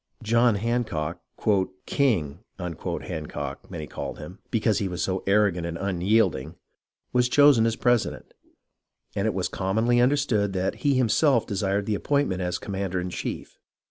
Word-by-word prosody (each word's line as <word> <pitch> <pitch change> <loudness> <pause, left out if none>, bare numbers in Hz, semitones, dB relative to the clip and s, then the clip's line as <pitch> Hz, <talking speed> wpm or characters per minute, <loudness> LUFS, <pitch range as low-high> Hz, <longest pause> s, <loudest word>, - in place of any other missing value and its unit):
John 115 +1 +3
Hancock, 100 -8 -2 0.3
" 95 -1 -3
King 90 - +1
" - - -49
Hancock 85 -3 -5
many 75 - -5
called - - -6
him, 90 +6 -10
because 110 -2 +1
he 100 - -1
was 90 -1 -3
so 95 0 -1
arrogant 100 -3 +3
and 85 0 -4
unyielding, 95 - +1 0.6
was 125 0 +3
chosen 135 -5 +6
president; 120 -2 0 0.8
and - - 0
it - - -1
was - - 0
commonly 110 +6 +1
understood 125 -7 +2
that 95 +2 -1
he 140 +4 +1
himself 130 +1 +3
desired 100 0 -1
the 110 - -1
appointment 120 -4 0
as 90 0 -1
commander 95 -2 -3
in 90 0 -4
chief. - - -6
100 Hz, 145 wpm, -25 LUFS, 90-120 Hz, 0.8 s, chosen